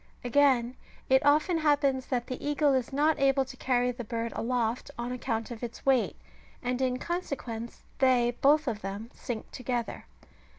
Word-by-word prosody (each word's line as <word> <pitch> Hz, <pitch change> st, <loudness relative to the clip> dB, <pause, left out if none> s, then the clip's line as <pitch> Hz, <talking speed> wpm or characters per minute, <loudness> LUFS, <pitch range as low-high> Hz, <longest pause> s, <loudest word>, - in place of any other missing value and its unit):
Again, 250 Hz, -1 st, +3 dB, 0.3 s
it 265 Hz, 0 st, +5 dB
often 305 Hz, +4 st, +3 dB
happens 285 Hz, -4 st, +2 dB
that 245 Hz, -2 st, -1 dB
the 255 Hz, -, -6 dB
eagle 290 Hz, -1 st, +2 dB
is 255 Hz, -3 st, 0 dB
not 300 Hz, +3 st, +2 dB
able 270 Hz, 0 st, +3 dB
to 260 Hz, -, -10 dB
carry 250 Hz, -1 st, +1 dB
the 245 Hz, 0 st, -6 dB
bird 230 Hz, +1 st, -3 dB
aloft 240 Hz, 0 st, -1 dB
on 240 Hz, +1 st, -3 dB
account 235 Hz, -2 st, -3 dB
of 230 Hz, -, -7 dB
its 235 Hz, -1 st, -7 dB
weight, 265 Hz, -3 st, +3 dB, 0.5 s
and 250 Hz, +1 st, -1 dB
in 255 Hz, -1 st, +1 dB
consequence 255 Hz, -9 st, -5 dB, 0.2 s
they 245 Hz, -2 st, +3 dB
both 300 Hz, +2 st, +4 dB
of 220 Hz, -4 st, -2 dB
them 200 Hz, +4 st, -6 dB
sink 230 Hz, -3 st, -6 dB
together. 245 Hz, -2 st, -3 dB
255 Hz, 165 wpm, -29 LUFS, 235-275 Hz, 0.5 s, it